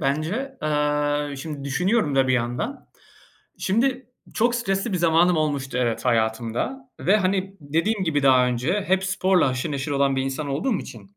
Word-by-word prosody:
bence, 170 - -2
eee, 150 -1 0
şimdi 145 0 -6
düşünüyorum 180 - +1
da 135 -1 +3
bir - - +3
yandan. 125 - -2 0.7
Şimdi, 250 +5 0 0.3
çok 235 +2 +2
stresli 195 -2 -1
bir 185 - 0
zamanım 170 +1 +4
olmuştu 140 -4 -1
evet, 115 -2 -1
hayatımda 120 - -1
ve, 195 +4 +4
hani, 195 -1 -1
dediğim 170 +8 0
gibi 145 -4 0
daha 130 -2 +5
önce, 125 - 0
hep 190 +1 +2
sporla 185 -4 +2
haşır 130 +4 -2
neşir 140 +1 -3
olan 140 -1 +1
bir 130 - +1
insan 135 +2 -3
olduğum 185 - 0
için 200 +1 -11
155 Hz, 160 wpm, -23 LUFS, 135-195 Hz, 0.7 s, daha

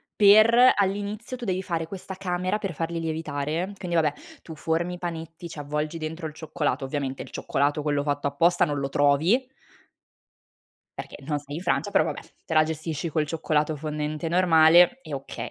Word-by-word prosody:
per 220 +5 +7
all'inizio 205 +5 -2
tu 240 - -7
devi 185 -1 -1
fare 165 -3 -2
questa 190 +2 -8
camera 185 +1 -1
per 195 -5 -4
farli 165 +2 -3
lievitare. 160 +3 -3
Quindi, 175 -3 -4
vabbè, 155 -3 +3 0.3
tu 160 - -10
formi 165 +3 -1
i - - -9
panetti, 165 -1 -6
ci 155 - -9
avvolgi 150 +3 -3
dentro 160 +1 -5
il 150 - -9
cioccolato, 150 -3 -2
ovviamente, 135 -1 -3
il - - -9
cioccolato 145 +2 -1
quello 145 -1 0
fatto 145 -1 -1
apposta 170 +5 +3
non 145 -2 -2
lo 135 - -2
trovi 155 - +3 1.5
perché - - -7
non 150 -2 -1
sei 145 +1 -8
in 175 - -6
Francia, 205 +2 0
però, - - +3
vabbè, - - -4 0.2
te 160 - -4
la 155 - +6
gestisci 160 +1 -3
col 155 -1 0
cioccolato 155 -1 0
fondente 150 +1 -3
normale 175 +5 +5
e 155 - -6
okay. 135 0 -6
160 Hz, 180 wpm, -25 LUFS, 150-180 Hz, 1.5 s, per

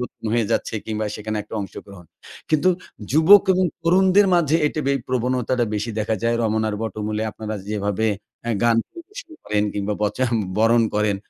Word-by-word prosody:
নতুন 125 - -8
হয়ে 115 -3 +1
যাচ্ছে - - -1
কিংবা 110 -1 -2
সেখানে 110 0 -4
একটা 105 - -10
অংশগ্রহণ। 100 -1 -9 0.5
কিন্তু 155 +3 +3 0.4
যুবক 165 +8 +7
এবং 185 0 +2 0.2
তরুণদের 190 +4 +4
মাঝে 160 -2 +3
এটি 155 - -2
বেশ 140 - +2
প্রবণতাটা 125 0 0
বেশি 105 +3 -2
দেখা 110 +1 0
যায়। 115 0 +1
রমনার 110 -1 0
বটমূলে 110 0 -3
আপনারা 110 0 -6
যেভাবে 105 +1 -1 0.4
আ - - +1
গান 120 -1 +4
পরিবেশন 350 +2 -11
করেন 105 0 0
কিংবা 105 +1 -2
বচা 115 +5 0 0.3
বরণ 115 +1 +4
করেন। 105 -1 +1
115 Hz, 160 wpm, -22 LUFS, 105-150 Hz, 0.5 s, যুবক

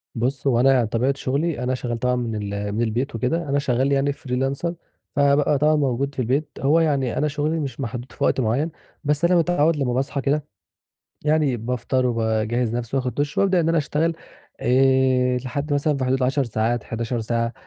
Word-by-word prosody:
بُصّ، 130 +4 -1
هو 120 -3 +3
أنا 135 +2 +5
يعني 120 -4 +2
طبيعة 125 +5 +1
شُغلي 140 0 -1
أنا 130 +1 0
شغّال 120 -2 -3
طبعًا 125 +1 +1
من 115 -3 -2 0.2
ال 100 0 -3
من 110 +3 -1
البيت 120 +3 -1
وكده، 140 +7 -1
أنا 140 +1 +2
شغّال 135 0 +1
يعني 140 +1 +2
Freelancer 135 +5 -2 0.4
فبقى 140 0 +3
طبعًا 155 +2 +3
موجود 140 -1 0
في - - -6
البيت، 140 +5 0
هو 150 +5 +4
يعني 140 -6 +1
أنا 150 - +1
شُغلي 150 +2 -1
مش 140 -2 -5
محدود 125 0 -5
في - - -5
وقت - - +2
معيّن، 125 +9 0 0.3
بس 150 +3 +1
أنا 180 +1 +4
متعوّد 165 -2 +3
لمّا 125 -3 0
باصحى 135 +2 -1
كده، 145 +2 0 0.8
يعني 150 -4 +2
بافطر 125 +2 -1
وباجهّز 115 0 0
نفسي 120 +2 -3
وآخُد 130 -1 -1
دُش، 145 0 -2
وابدأ 190 -3 +3
إن 165 - 0
أنا 165 -1 +3
أشتغل 155 +2 0 0.5
آآ، 130 -1 +3
لحد 140 +4 -4
مثلًا 145 0 +1
في 130 - -1
حدود 130 +1 +1
ال10 135 +2 +1
ساعات، 115 0 -1
11 115 +1 -3
ساعة، 115 +1 -1
135 Hz, 195 wpm, -23 LUFS, 120-145 Hz, 0.8 s, أنا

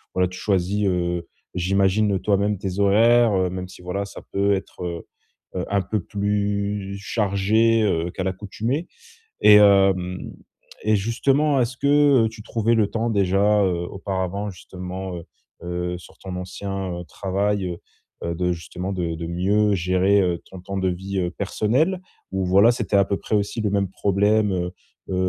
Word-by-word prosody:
voilà 90 -1 +2
tu 90 - -9
choisis, 100 +1 0
heu, 85 -1 -1 0.3
j'imagine, 95 +3 +2
heu, 95 - 0
toi-même 100 +2 +1
tes 95 0 -4
horaires, 115 +3 +5
heu, 95 -1 +1
même 90 0 -5
si, 90 - -14
voilà, 100 +3 -3
ça - - -10
peut 100 +1 +2
être, 95 -1 -5
heu, 85 -1 -5 0.5
heu, 90 - -2
un 100 0 +2
peu 100 +2 -2
plus 100 0 -2
chargé, 105 +2 +2
heu, 85 -4 0
qu'à 95 - -4
l'accoutumée. 110 - -3 0.5
Et 105 - +8
hem 95 -3 +3 0.5
et 110 0 +3
justement 135 +7 +1
est-ce 120 +2 -3
que 140 -4 +4
tu 110 -1 -11
trouvais 115 +1 0
le 110 -3 +2
temps, 115 +1 -1
déjà, 100 +1 +3
heu, 85 -2 -1
auparavant, 95 +1 -3
justement, 90 +1 -7
heu, 85 - -8 0.4
heu, 90 0 -3
sur 90 - -16
ton 95 -1 -7
ancien, 95 0 -4
heu, - - -8
travail, 100 +2 -1
heu, 85 -1 -4 0.5
heu 85 0 -2
de 90 +1 0
justement 90 +3 -5
de 85 -3 -2
de 85 0 -5
mieux 100 +4 +2
gérer, 95 +2 +2
heu, 90 -2 0
ton 95 - -9
temps 100 +2 -6
de 95 -1 +1
vie, 95 +2 -3
heu, 90 - -1
personnelle? 125 - 0 0.3
Ou 95 -1 -1
voilà 100 +6 +5
c'était 110 -4 -1
à 100 - +5
peu 100 - -1
près 110 - -1
aussi 105 +3 -1
le 105 -2 0
même 100 -2 +1
problème? 105 +2 +2
Heu, 90 -1 -2 0.4
heu 95 - -1
100 Hz, 175 wpm, -23 LUFS, 90-105 Hz, 0.5 s, Et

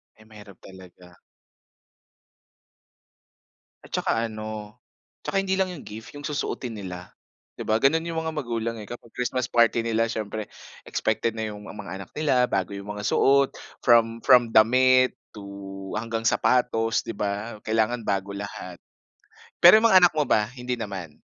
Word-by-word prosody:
Ay, 110 - -19
mahirap 105 -3 -14
talaga. 90 -1 -15 2.7
At - - -17
tsaka 115 +1 0
ano, 110 0 -7 0.4
tsaka - - -2
hindi 190 -1 -1
lang 190 -1 +1
yung 165 - -10
gift 110 +1 -9
yung 145 - -8
susuotin 135 -4 -3
nila. 90 -2 -8 0.4
Di - - -6
ba 110 - +2
ganun 160 +4 +3
yung 165 -1 -2
mga 160 0 -4
magulang 115 -5 -3
eh. - - -8
Kapag 120 +1 -10
Christmas 125 0 -2
party 115 0 +3
nila 115 0 +1
siyempre 110 -1 -4 0.4
expected 115 - -1
na 110 -1 -2
yung 105 0 -11
ma - - -9
mga 100 -3 -8
anak 95 - -11
nila 135 -5 +3
bago 95 0 -1
yung 100 +1 -7
mga 105 - -6
suot, 140 +4 +3 0.3
from 115 -1 +4
from 125 -3 +6
damit 130 +3 +5 0.2
to 100 -1 -9
hanggang 115 0 -3
sapatos, 115 -1 +2
'di 115 - -4
ba, 105 +2 -3
kailangan 110 +2 +1
bago 100 0 -1
lahat. 100 -3 -7 0.8
Pero 180 +5 +9
yung 230 - +4
mga 185 - +9
anak 175 - +6
mo 150 - +2
ba, 105 -6 +2
hindi 125 0 -3
naman? 95 -8 -7
115 Hz, 160 wpm, -25 LUFS, 105-125 Hz, 2.7 s, Pero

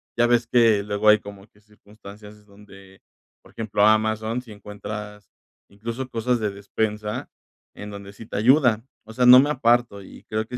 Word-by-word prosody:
Ya 120 0 +2
ves 120 -1 +1
que 115 -4 +3
luego 105 +1 +1
hay 105 0 +6
como 100 -1 -12
que 105 - -28
circunstancias 105 0 -16
donde, 100 -2 -18 0.4
por - - -20
ejemplo, 105 -2 0
Amazon 110 +2 +1
sí 120 -3 -15
encuentras, 105 0 -9 0.4
incluso, 115 +6 -6
cosas 120 +1 -1
de 105 -2 -2
despensa 105 +1 -4 0.5
en 105 - -9
donde 100 -1 -10
sí 115 - -12
te - - -6
ayuda, 120 -1 +3 0.2
o 110 - -12
sea, 125 +2 +1
no 125 +1 +9
me 145 - -1
aparto 120 -6 +1
y 95 - -14
creo 110 +1 -2
que 125 - -7
105 Hz, 175 wpm, -23 LUFS, 105-115 Hz, 0.5 s, no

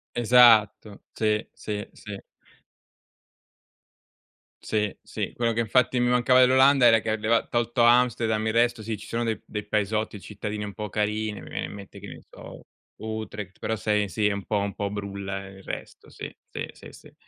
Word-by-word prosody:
Esatto. 115 -4 +5
Sì, 105 -1 0
sì, 105 -1 -5
sì. 105 -1 -8 2.5
Sì, 105 -2 -1
sì. - - -5
Quello 115 -1 0
che 115 - -2
infatti 125 +2 +2
mi 125 - +2
mancava 125 +1 +4
dell'Olanda 130 0 +6
era 115 -1 +6
che 110 0 -1
leva 115 +2 +1
tolto 120 0 +1
Amsterdam, 120 -2 +3
il 110 - 0
resto, 120 0 +2
sì, 110 0 -4
ci 105 - -11
sono 120 +1 -2
dei 110 -3 -1
dei 105 -1 -6
paesotti, 105 0 -1
cittadini 105 +1 -6
un 100 -1 -6
po' 105 -1 -5
carini, 105 +1 -2
mi - - -11
viene - - -3
in - - -9
mente, 100 -1 -11
che - - -10
ne - - -10
so, - - -12 0.3
Utrecht, 105 -3 -6
però 110 - -2
sei 105 -1 0
sì, 105 +5 -1
è 105 - +3
un 100 -1 -4
po' 105 - 0
un 100 0 -2
po' 100 -1 -3
brulla 100 -1 -5
il 95 0 -13
resto, - - -8
sì, - - -9
sì, - - -5
sì, - - -13
sì. - - -16
110 Hz, 180 wpm, -25 LUFS, 105-115 Hz, 2.5 s, dell'Olanda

